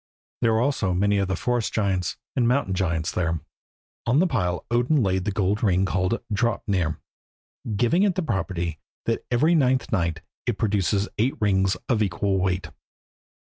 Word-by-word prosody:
There 115 -2 +3
were 110 - +2
also 120 -9 +1
many 100 +2 +2
of 100 - 0
the 95 - 0
forest 120 +4 -1
giants 95 -5 0 0.2
and 125 -3 +2
mountain 125 -6 +1
giants 80 -4 0
there. 85 -2 -1 0.7
On 125 +3 +3
the 175 - +5
pile 90 - -1
Odin 125 +4 +3
laid 95 -1 0
the 105 - 0
gold 100 +1 0
ring 95 -3 +3
called 95 +4 0
Draupnir, 100 -7 0 0.8
giving 120 - +2
it 200 -3 +3
the 185 - -1
property 90 - -2 0.3
that 115 - -1
every 140 +7 +3
ninth 130 -6 +2
night 85 -5 0 0.3
it 120 -4 0
produces 100 -1 +1
eight 125 +5 +1
rings 95 -2 +2
of 115 -4 +1
equal 95 0 0
weight. 90 -3 -1
100 Hz, 165 wpm, -24 LUFS, 90-120 Hz, 0.8 s, the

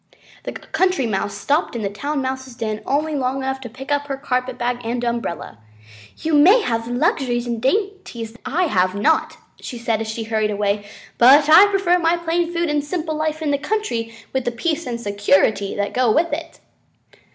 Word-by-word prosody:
The - - -4
Country 365 -3 0
Mouse 205 -2 -2
stopped 290 -2 0
in 230 - -3
the - - 0
Town 280 +7 -3
Mouse's 260 -1 -4
den 215 -2 -3
only 305 +3 0
long 265 -2 -1
enough 265 0 -3
to 245 - -7
pick 265 +5 -9
up 285 0 0
her 275 -1 -3
carpet 255 -2 -2
bag 245 0 -1
and 240 +1 -2
umbrella. 235 - -3 0.6
"You 320 0 -3
may 370 +11 +6
have 230 -1 -1
luxuries 245 -2 0
and 235 -2 -3
dainties 375 - -2
that 235 - -19
I 305 +8 0
have 185 - +1
not," 310 +11 +1 0.2
she 245 - -7
said 230 -2 -1
as 225 - -3
she 220 +1 -4
hurried 220 -1 0
away, 205 0 -1 0.3
"but 280 +5 +7
I 340 +6 +8
prefer 385 -3 +2
my 335 0 +2
plain 340 0 -1
food 340 0 0
and 295 -1 0
simple 315 +1 -3
life 310 +1 -2
in 295 - 0
the 280 - +1
country 290 - -2 0.2
with 265 -1 0
the 240 - -1
peace 315 +7 -2
and 235 -1 -3
security 205 -1 +1
that 205 0 -2
go 250 -3 +3
with 335 +7 +1
it." - - -6
260 Hz, 195 wpm, -21 LUFS, 230-315 Hz, 0.6 s, I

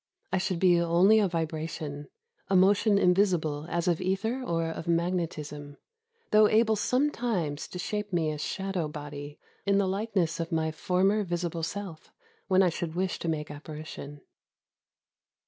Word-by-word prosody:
I 190 - +3
should 185 -1 -1
be 175 -1 +4
only 175 +6 +5
a 205 - +3
vibration, 160 -3 -4 0.2
— 470 - -44
a 195 - +2
motion 200 +2 +4
invisible 180 -6 +2
as 170 0 -1
of 175 -1 +1
ether 200 +7 -1
or 165 -9 -1
of 165 0 -6
magnetism; 160 -4 -2 0.5
though 215 0 +6
able 220 0 +4
sometimes 230 - 0
to - - -8
shape 210 +3 -3
me 165 -3 +1
a 150 - -5
shadow 190 0 -2
body, 145 -1 -8 0.3
in 200 -1 +2
the 200 -1 +2
likeness 190 -4 -1
of 165 0 -3
my 160 -1 0
former 190 +6 +1
visible 175 -2 -3
self, 170 -1 -6 0.4
when 190 0 +4
I 180 - +4
should 170 -1 -4
wish 185 +1 -1
to 170 - -2
make 150 -2 -3
apparition. 150 -1 -8
175 Hz, 155 wpm, -28 LUFS, 160-195 Hz, 0.5 s, though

